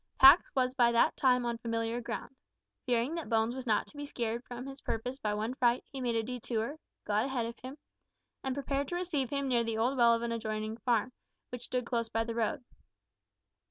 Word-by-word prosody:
Pax 275 +6 +9
was 255 -1 +2
by 240 -3 +4
that 235 - +4
time 250 -2 +3
on 235 -1 -2
familiar 230 +1 -2
ground. 235 +3 -6 0.5
Fearing 245 +4 +1
that 335 -1 -4
Bones 225 0 +2
was 260 0 -6
not 215 - +2
to - - -17
be 290 0 -5
scared 235 -3 -3
from 245 0 -7
his 275 0 -8
purpose 250 +4 -3
by 210 -4 -1
one 220 +4 -2
fright, 245 -1 +2
he 270 -2 -5
made 240 -2 0
a 225 - +1
detour, 240 +2 -3 0.3
got 210 +3 +1
ahead 260 -4 -1
of 235 +1 -7
him, 260 +3 -8 0.7
and 265 -1 -1
prepared 280 0 -1
to 350 - -3
receive 330 -8 -1
him 280 -1 -1
near 240 -2 +2
the 225 -1 -2
old 245 +5 +1
well 235 -1 +6
of 230 - -3
an 235 - -1
adjoining 220 -1 -3
farm, 235 +1 +1 0.4
which 245 -1 -6
stood 250 -1 -2
close 230 -2 -1
by 225 +1 0
the 230 0 -4
road. 235 +5 -1
240 Hz, 215 wpm, -31 LUFS, 230-265 Hz, 0.7 s, Pax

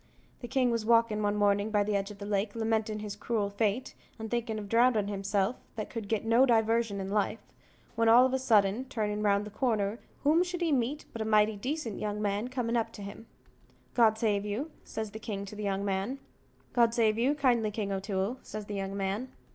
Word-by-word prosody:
The 240 - -7
king 250 0 +2
was 230 -2 0
walkin' 230 -1 +3
one 205 0 +1
mornin' 205 0 +2
by 210 -1 +2
the 210 0 -1
edge 195 0 -1
of 210 - -10
the 200 - -7
lake, 205 +1 -1
lamentin' 220 -1 -1
his 210 -1 -5
cruel 210 -1 -1
fate, 210 +4 -1 0.2
and 220 -1 -7
thinking 235 -2 -1
of 210 -1 -6
drowning 230 -2 +3
himself, 200 +2 0 0.2
that 215 -2 -5
could 225 -4 -5
get 220 +1 -1
no 230 +3 +5
diversion 225 -2 +2
in 190 0 -4
life, 210 0 +1 0.6
when 230 0 +3
all 240 +3 +8
of 260 - 0
a 265 - +1
sudden, 220 -1 +3
turning 210 -5 -2
round 205 -1 +2
the 210 - -8
corner, 215 -2 0 0.2
whom 310 +4 +4
should 355 -1 -5
he 335 -2 +1
meet 275 +3 0
but 230 - -5
a - - +1
mighty 215 0 +3
decent 250 +1 -3
young 210 0 -2
man 205 +2 -1
coming 245 -2 -2
up 230 -1 0
to 205 - -8
him. 200 +3 -9 0.7
"God 225 -3 +4
save 210 -3 +1
you," 220 +10 -3
says 220 -1 -5
the 220 - -8
king 200 -2 -4
to 200 - -9
the 210 - -6
young 200 -1 -1
man. 195 +7 -1 0.6
"God 235 -1 +3
save 220 -2 +2
you 265 +5 +2
kindly, 245 -6 +2
King 210 -1 -3
O'Toole," 195 +4 -2
says 215 -1 -7
the 205 - -6
young 195 0 -3
man. 200 +6 -2
215 Hz, 220 wpm, -30 LUFS, 205-235 Hz, 0.7 s, all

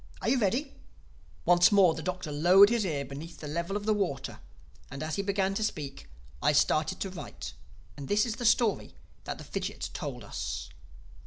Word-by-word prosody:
Are - - +1
you 270 - +3
ready?" 245 +7 0 0.7
Once 175 +2 +6
more 195 -5 +6
the 160 - -6
Doctor 180 -2 -4
lowered 180 +7 +7
his 235 -3 +1
ear 145 -5 -2
beneath 145 +5 -9
the 150 - -7
level 170 +6 -2
of 205 - -7
the 215 - +3
water; 175 -10 -2 0.5
and 135 +3 -6
as 155 -1 -2
he - - 0
began 195 -1 0
to 220 - -1
speak, 150 -10 -4 0.3
I - - +3
started 155 +5 +2
to 195 - -2
write. 180 - -8 0.4
And 140 - -8
this 210 +3 +3
is 230 -2 -3
the 245 - -5
story 225 -1 +2 0.3
that - - -4
the - - -9
fidgit - - -4
told - - -5
us. - - -5
185 Hz, 190 wpm, -29 LUFS, 155-205 Hz, 0.7 s, lowered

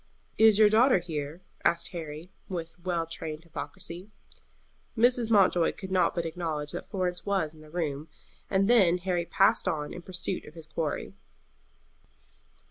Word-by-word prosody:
"Is 220 -2 +7
your 215 -1 +7
daughter 230 +4 +5
here?" 160 -1 -5 0.2
asked 170 0 +2
Harry, 165 -1 -7 0.2
with 170 -2 -5
well 175 -3 0
trained 160 -1 -5
hypocrisy. 170 +3 -7 0.9
Mrs. 240 0 +3
Mountjoy 190 -6 +4
could 190 -1 -9
not 180 -3 +2
but 170 -1 -1
acknowledge 160 -3 -3
that - - -6
Florence 180 -3 -2
was 190 -6 0
in 155 - -16
the 155 - -14
room, 155 -3 -3 0.4
and 195 0 +2
then 195 -7 +5
Harry 180 -1 -1
passed 195 +1 +3
on 150 -4 -2
in 175 - -7
pursuit 185 +1 -3
of 150 - -13
his 165 -2 -8
quarry. 155 -1 -3
175 Hz, 150 wpm, -28 LUFS, 160-190 Hz, 0.9 s, Is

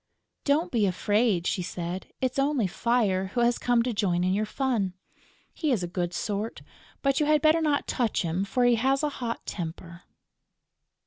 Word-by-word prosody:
"Don't 295 +4 +2
be 220 -5 +2
afraid," 205 0 +1
she 185 - 0
said. 175 +1 -5
"It's 255 +1 0
only 275 -4 +2
Fire, 195 -2 +1
who 240 - +2
has 240 0 +2
come 240 -1 +2
to 245 0 -1
join 180 -4 +1
in 185 +1 +2
your 210 +2 0
fun. 230 -8 -1 0.6
He 310 -4 -1
is 215 -8 +1
a - - -2
good 175 0 -2
sort, 210 +3 -3 0.4
but 275 -1 +2
you 300 - +2
had 305 0 +3
better 315 +1 +5
not 295 -2 +1
touch 235 -6 0
him, 170 +3 -1
for 245 +5 +1
he 240 -1 +4
has 270 +4 +1
a 300 - +2
hot 230 -1 -3
temper." 170 0 -6
225 Hz, 185 wpm, -27 LUFS, 185-265 Hz, 0.6 s, better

